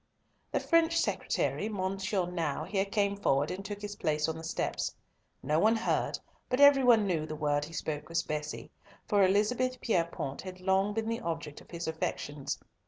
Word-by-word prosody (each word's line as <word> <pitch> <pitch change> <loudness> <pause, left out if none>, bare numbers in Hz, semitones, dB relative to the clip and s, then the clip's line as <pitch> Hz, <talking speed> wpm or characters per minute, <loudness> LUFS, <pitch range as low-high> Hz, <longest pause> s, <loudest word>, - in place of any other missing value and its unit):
The - - +1
French 335 0 +3
secretary, 215 - 0
Monsieur 195 -1 -1
Nau, 165 -5 -2
here 195 -1 0
came 200 0 +1
forward 145 -8 +1
and 190 +2 -5
took 205 +1 -6
his 205 0 -4
place 150 -2 0
on 160 - -2
the 160 - -8
steps. 165 - -2 0.5
No 150 +1 +2
one 220 +5 +4
heard, 225 +1 0 0.3
but 250 - 0
every 285 -1 +8
one 230 -4 +6
knew 165 -5 0
the 155 - -5
word 145 -1 0
he 165 - -12
spoke 150 -2 -4
was 170 +1 0
"Bessie," 150 0 -4 0.4
for 205 -2 +4
Elizabeth 240 +7 +2
Pierrepoint 170 - -1
had 185 -1 -8
long 190 +2 +1
been 225 0 -1
the 230 +1 -2
object 165 -3 -4
of - - -18
his 170 -1 -5
affections. 150 -3 -3
190 Hz, 180 wpm, -31 LUFS, 160-210 Hz, 0.5 s, every